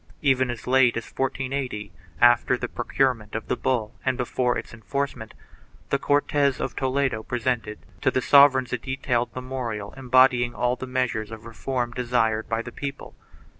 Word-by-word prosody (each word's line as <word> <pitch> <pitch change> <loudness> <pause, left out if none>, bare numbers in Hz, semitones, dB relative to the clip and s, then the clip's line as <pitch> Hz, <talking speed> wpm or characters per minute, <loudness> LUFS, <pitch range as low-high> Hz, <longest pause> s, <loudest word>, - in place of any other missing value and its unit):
4 - - -33
Even 130 -3 +3
as 120 -2 -5
late 125 -2 +4
as 115 - -4
1480, 130 -6 -3 0.3
after 120 +1 +5
the 125 - -3
pro 120 - -5
curement 125 -6 0
of 115 - -4
the - - +2
bull 120 -4 -1
and 130 -2 0
before 125 0 0
its - - -7
enforcement, 120 +1 -4 0.6
the 140 - +2
Cortes 145 -1 +1
of - - -3
Toledo 130 -3 0
presented 120 -2 -2 0.2
to - - +3
the - - 0
sovereigns 130 -2 +5
a 125 - 0
detailed 125 -2 -1
memorial 125 -5 -4
embody 130 -1 +4
ing 120 0 -4
all 125 +3 +1
the 130 - -7
measures 125 -4 -1
of 110 0 -9
reform 120 +1 -3
desired 120 -3 0
by 115 0 -1
the 120 - -8
people. 140 +1 -6
125 Hz, 170 wpm, -25 LUFS, 115-130 Hz, 0.6 s, after